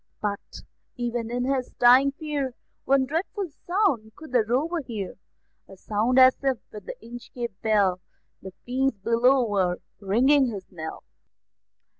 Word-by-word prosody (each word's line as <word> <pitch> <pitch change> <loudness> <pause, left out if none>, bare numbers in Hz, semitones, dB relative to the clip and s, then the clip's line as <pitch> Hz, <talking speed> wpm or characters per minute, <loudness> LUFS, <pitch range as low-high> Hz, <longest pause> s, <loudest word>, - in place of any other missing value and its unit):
But, 205 -1 -5 0.3
even 240 -1 -3
in 245 +1 -2
his 260 -2 -1
dying 255 +3 +6
fear, 285 -4 -3 0.3
One 270 -1 +3
dreadful 345 +6 -3 0.2
sound 295 - +1
could 315 -4 -12
the 245 -3 +3
Rover 285 +10 0
hear, 215 -8 -5 0.6
A 195 - -13
sound 220 +6 0
as 260 0 +7
if, 265 -2 +1
with 210 -2 -10
the - - -5
Inchcape 240 -1 -7
Bell, 200 -5 +2 0.4
The 190 - -8
fiends 260 -1 0
below 240 +5 +3
were 190 -4 +1 0.2
ringing 255 +8 +3
his 200 -5 -5
knell. 160 -3 -7
245 Hz, 140 wpm, -25 LUFS, 215-270 Hz, 0.6 s, as